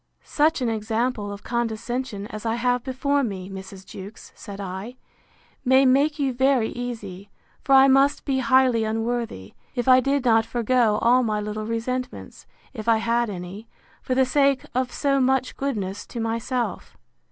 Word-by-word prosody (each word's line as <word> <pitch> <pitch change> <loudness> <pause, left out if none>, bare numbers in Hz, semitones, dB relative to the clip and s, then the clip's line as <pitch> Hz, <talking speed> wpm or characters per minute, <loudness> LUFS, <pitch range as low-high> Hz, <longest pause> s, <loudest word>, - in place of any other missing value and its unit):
Such 305 -1 +1
an - - +1
example 220 0 -2
of 200 0 -9
condescension, 235 -1 -3
as 215 0 -7
I 225 0 0
have 245 0 0
before 280 +2 0
me, 195 -4 -5
Mrs. 190 0 -9
Jewkes, 195 +4 -11
said 200 -2 -10
I, 195 +5 -6 0.7
may 260 +1 +5
make 280 +4 +3
you 275 -3 0
very 260 -2 +2
easy; 210 -6 -7 0.3
for 275 - +3
I 270 0 +8
must 275 +2 +3
be 270 -2 0
highly 255 -2 +3
unworthy, 225 - -3 0.2
if 245 -1 -2
I 255 0 +7
did 275 +1 0
not 225 -2 +4
forego 235 -1 +1
all 245 +2 +5
my 215 -3 -1
little 210 +1 -4
resentments, 250 +3 -4 0.3
if 220 -3 -7
I 230 -1 +5
had 235 +1 0
any, 190 +3 -7 0.3
for 255 - -2
the 265 0 +4
sake 275 0 +2
of 255 0 -1
so 275 -1 +1
much 260 0 +1
goodness 205 -8 -3
to 235 - -7
myself. 230 0 -3
240 Hz, 165 wpm, -24 LUFS, 215-260 Hz, 0.7 s, I